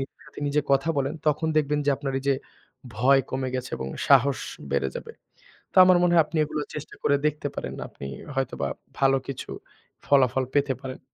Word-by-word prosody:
নিজের 135 Hz, -, -7 dB
সাথে 150 Hz, -, -12 dB
নিজে 150 Hz, +1 st, +2 dB
কথা 135 Hz, +4 st, +2 dB
বলেন, 135 Hz, +2 st, -1 dB
তখন 150 Hz, +2 st, +1 dB
দেখবেন 150 Hz, -1 st, +2 dB
যে -, -, +5 dB
আপনার 140 Hz, -1 st, -4 dB
এইযে 140 Hz, 0 st, +2 dB, 0.6 s
ভয় 135 Hz, +4 st, +5 dB
কমে 130 Hz, 0 st, -2 dB
গেছে 130 Hz, 0 st, -3 dB
এবং 65 Hz, -, -5 dB, 0.2 s
সাহস 140 Hz, 0 st, +5 dB, 0.3 s
বেড়ে 70 Hz, -1 st, +1 dB
যাবে। -, -, -8 dB, 0.6 s
তো -, -, -4 dB
আমার 180 Hz, -1 st, +6 dB
মনে 175 Hz, -1 st, +3 dB
হয় 165 Hz, -, +7 dB
আপনি 160 Hz, -, -5 dB
এগুলো 150 Hz, 0 st, -3 dB
চেষ্টা 150 Hz, -, -7 dB
করে 145 Hz, -, +4 dB
দেখতে 150 Hz, -1 st, -2 dB
পারেন, -, -, -4 dB
আপনি 70 Hz, -, -9 dB, 0.3 s
হয়তোবা 120 Hz, -, -1 dB, 0.3 s
ভালো 135 Hz, 0 st, +4 dB
কিছু 135 Hz, -, -6 dB, 0.6 s
ফলাফল 130 Hz, -2 st, +3 dB
পেতে 140 Hz, -1 st, +2 dB
পারেন। 130 Hz, -1 st, -7 dB
140 Hz, 185 wpm, -25 LUFS, 130-150 Hz, 0.6 s, হয়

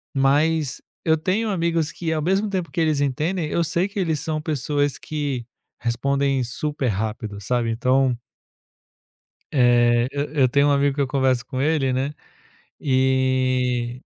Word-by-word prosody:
Mas, 145 Hz, +1 st, +2 dB, 0.2 s
eu 160 Hz, -1 st, +4 dB
tenho 195 Hz, +8 st, 0 dB
amigos 165 Hz, -4 st, 0 dB
que 165 Hz, 0 st, -3 dB
ao 155 Hz, -, -1 dB
mesmo 195 Hz, +6 st, +1 dB
tempo 180 Hz, -6 st, -3 dB
que 140 Hz, -, -3 dB
eles 155 Hz, -3 st, +2 dB
entendem, 155 Hz, +5 st, -1 dB
eu 170 Hz, -, +1 dB
sei 170 Hz, +4 st, 0 dB
que 200 Hz, -, -5 dB
eles 160 Hz, -5 st, 0 dB
são 155 Hz, -1 st, -2 dB
pessoas 145 Hz, -2 st, -1 dB
que 145 Hz, -6 st, -3 dB, 0.4 s
respondem 135 Hz, +3 st, 0 dB
super 140 Hz, +3 st, -2 dB
rápido, 110 Hz, 0 st, -3 dB
sabe. 120 Hz, +2 st, 0 dB
Então 125 Hz, +2 st, +2 dB, 1.4 s
eh, 120 Hz, -2 st, +4 dB
eu 145 Hz, 0 st, -1 dB
eu 135 Hz, -4 st, +3 dB
tenho 140 Hz, +2 st, +3 dB
um -, -, +3 dB
amigo 140 Hz, 0 st, +2 dB
que 145 Hz, -, 0 dB
eu 140 Hz, -, +1 dB
converso 130 Hz, -2 st, +1 dB
com 130 Hz, 0 st, -3 dB
ele, 145 Hz, -4 st, +1 dB
né, 135 Hz, +3 st, -1 dB, 0.7 s
e, 130 Hz, -2 st, +1 dB
140 Hz, 155 wpm, -23 LUFS, 125-155 Hz, 1.4 s, eu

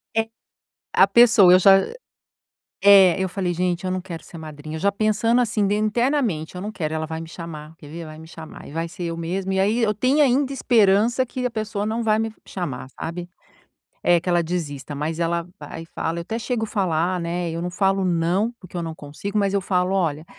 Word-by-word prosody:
É. 225 Hz, 0 st, +1 dB, 0.7 s
A -, -, +6 dB
pessoa, 220 Hz, -6 st, +6 dB
eu 185 Hz, -, +8 dB
já 195 Hz, +1 st, +7 dB
hã, 195 Hz, -, -3 dB, 0.9 s
é, 195 Hz, -3 st, +8 dB
eu 190 Hz, -, 0 dB
falei: 180 Hz, -2 st, -2 dB
"Gente, 180 Hz, +1 st, -1 dB
eu 185 Hz, -, -1 dB
não 185 Hz, 0 st, -2 dB
quero 170 Hz, -4 st, -8 dB
ser 170 Hz, -, -12 dB
madrinha", 155 Hz, -1 st, -8 dB
eu 160 Hz, -, -5 dB
já 200 Hz, +3 st, +2 dB
pensando 215 Hz, +3 st, +2 dB
assim 210 Hz, -4 st, +1 dB
de 205 Hz, -, +1 dB
internamente, 215 Hz, -, 0 dB
"Eu 180 Hz, -, -6 dB
não 210 Hz, +2 st, -4 dB
quero, 155 Hz, -6 st, -3 dB
ela 160 Hz, 0 st, -2 dB
vai 160 Hz, 0 st, -5 dB
me 165 Hz, -, -8 dB
chamar, 160 Hz, -2 st, -9 dB
quer 145 Hz, -, -13 dB
ver? 165 Hz, +1 st, -7 dB
Vai 155 Hz, 0 st, -10 dB
me 160 Hz, -, -12 dB
chamar 160 Hz, -1 st, -11 dB
e -, -, -11 dB
vai 165 Hz, +2 st, -3 dB
ser 175 Hz, +1 st, -8 dB
eu 165 Hz, 0 st, -4 dB
mesmo". 185 Hz, +3 st, -3 dB
E 190 Hz, -, +1 dB
aí 210 Hz, +5 st, +2 dB
eu 210 Hz, -1 st, +2 dB
tenho 260 Hz, +8 st, +3 dB
ainda 275 Hz, +1 st, +2 dB
esperança 230 Hz, 0 st, +3 dB
que 250 Hz, +1 st, -5 dB
a 245 Hz, -, -1 dB
pessoa 215 Hz, -2 st, -3 dB
não 225 Hz, +2 st, -2 dB
vai 215 Hz, -1 st, +2 dB
me 225 Hz, 0 st, -2 dB
chamar, 135 Hz, -9 st, -5 dB
sabe, 175 Hz, +4 st, -6 dB, 0.7 s
eh, 175 Hz, -1 st, +4 dB
que 180 Hz, -, -6 dB
ela 175 Hz, -1 st, +3 dB
desista, 155 Hz, -4 st, -4 dB
mas 155 Hz, +3 st, -3 dB
ela 170 Hz, 0 st, -1 dB
vai 165 Hz, -, -8 dB
e -, -, -12 dB
fala. 165 Hz, 0 st, -3 dB
Eu -, -, -3 dB
até 220 Hz, +6 st, -4 dB
chego 230 Hz, -1 st, -2 dB
falar, 180 Hz, -3 st, 0 dB
né, 170 Hz, 0 st, -2 dB
eu 165 Hz, +1 st, -4 dB
não 180 Hz, -, -3 dB
falo 195 Hz, +2 st, +1 dB
não, 180 Hz, +6 st, +1 dB
porque 185 Hz, -1 st, -11 dB
eu 170 Hz, -, -2 dB
não 165 Hz, -1 st, -5 dB
consigo, 160 Hz, +8 st, -5 dB
mas 200 Hz, -1 st, +1 dB
eu 200 Hz, -, +2 dB
falo: 185 Hz, 0 st, 0 dB
"Olha, 160 Hz, -5 st, 0 dB
185 Hz, 230 wpm, -22 LUFS, 165-215 Hz, 0.9 s, eu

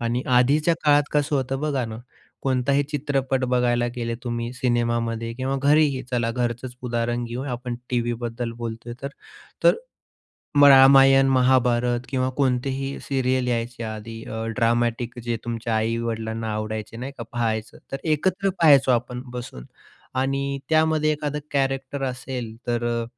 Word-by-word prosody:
आणि 120 Hz, +1 st, -1 dB, 0.2 s
आधीच्या 150 Hz, +6 st, +3 dB
काळात 145 Hz, -1 st, +5 dB
कसं 145 Hz, 0 st, +1 dB
होतं 135 Hz, 0 st, -2 dB
बघा 145 Hz, -4 st, 0 dB
ना, 110 Hz, 0 st, -6 dB, 0.5 s
कोणताही 135 Hz, +2 st, +2 dB
चित्रपट 135 Hz, -3 st, 0 dB
बघायला 125 Hz, -1 st, +1 dB
गेले 115 Hz, -1 st, -2 dB
तुम्ही 120 Hz, 0 st, -3 dB
सिनेमामध्ये 120 Hz, -2 st, -1 dB
किंवा 130 Hz, +2 st, -2 dB
घरीही 145 Hz, -2 st, +3 dB
चला 120 Hz, -2 st, 0 dB
घरचंच 120 Hz, +1 st, -3 dB
उदाहरण 120 Hz, 0 st, -1 dB
घेऊ, 120 Hz, +2 st, -5 dB
आपण 125 Hz, -2 st, -4 dB, 0.2 s
टीव्हीबद्दल 120 Hz, -1 st, -2 dB
बोलतोय 115 Hz, 0 st, -6 dB
तर. 140 Hz, -, -2 dB, 0.6 s
तर -, -, +7 dB, 1.0 s
रामायण, 135 Hz, 0 st, +7 dB
महाभारत 125 Hz, -2 st, +3 dB
किंवा 130 Hz, -1 st, 0 dB
कोणतेही 135 Hz, 0 st, -1 dB
सीरियल 130 Hz, -2 st, 0 dB
यायचे 120 Hz, 0 st, -2 dB
आधी 110 Hz, +1 st, -7 dB
अ, 110 Hz, 0 st, -5 dB
ड्रामॅटिक 120 Hz, 0 st, 0 dB
जे 120 Hz, -1 st, -1 dB
तुमच्या 115 Hz, -1 st, -2 dB
आई-वडिलांना 110 Hz, 0 st, -2 dB
आवडायचे 110 Hz, +1 st, -4 dB
नाही 130 Hz, +4 st, -6 dB
का -, -, -4 dB
पाहायचं. 110 Hz, -2 st, -2 dB
तर -, -, 0 dB, 0.2 s
एकत्र 190 Hz, +5 st, +1 dB
पहायचो 140 Hz, -5 st, +6 dB
आपण 125 Hz, +1 st, -1 dB
बसून. 120 Hz, -, -7 dB, 0.5 s
आणि 135 Hz, +1 st, -1 dB
त्यामध्ये 155 Hz, -1 st, +3 dB
एखादा 150 Hz, -1 st, -3 dB
कॅरेक्टर 135 Hz, 0 st, -1 dB
असेल 125 Hz, -3 st, -5 dB
तर, 120 Hz, -1 st, -1 dB
125 Hz, 130 wpm, -24 LUFS, 115-135 Hz, 1.0 s, तर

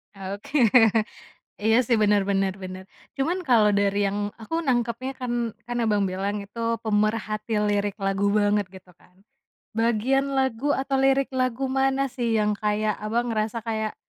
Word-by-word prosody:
Oke. 200 Hz, +9 st, -5 dB, 1.0 s
Iya, 220 Hz, +2 st, +3 dB
sih, 235 Hz, -, +3 dB
bener 205 Hz, -1 st, +4 dB
bener 195 Hz, -1 st, +1 dB
bener. 185 Hz, 0 st, -7 dB, 0.3 s
Cuman 330 Hz, +7 st, 0 dB
kalau 220 Hz, -4 st, +5 dB
dari 200 Hz, 0 st, +2 dB
yang 205 Hz, +1 st, -3 dB
aku 225 Hz, +9 st, -6 dB
nangkepnya 245 Hz, 0 st, -1 dB
kan 245 Hz, -1 st, -3 dB, 0.4 s
kan, 240 Hz, -, -3 dB
Abang, 210 Hz, -2 st, +2 dB
bilang 200 Hz, +2 st, -2 dB
itu 210 Hz, +4 st, -9 dB, 0.2 s
pemerhati 215 Hz, +1 st, -1 dB, 0.2 s
lirik 205 Hz, 0 st, 0 dB
lagu 195 Hz, +1 st, +1 dB
banget 205 Hz, -1 st, +2 dB
gitu 190 Hz, -1 st, -14 dB
kan, 180 Hz, -, -25 dB, 0.6 s
bagian 240 Hz, +5 st, +1 dB
lagu 265 Hz, +1 st, +1 dB
atau 270 Hz, 0 st, -2 dB
lirik 270 Hz, 0 st, +2 dB
lagu 260 Hz, 0 st, -1 dB
mana, 270 Hz, 0 st, +1 dB
sih, 235 Hz, -4 st, -1 dB
yang 210 Hz, 0 st, +2 dB
kayak, 210 Hz, 0 st, 0 dB
Abang, 230 Hz, +3 st, -1 dB
ngerasa 220 Hz, +1 st, -2 dB
kayak 220 Hz, -2 st, -3 dB
215 Hz, 150 wpm, -25 LUFS, 205-255 Hz, 1.0 s, kalau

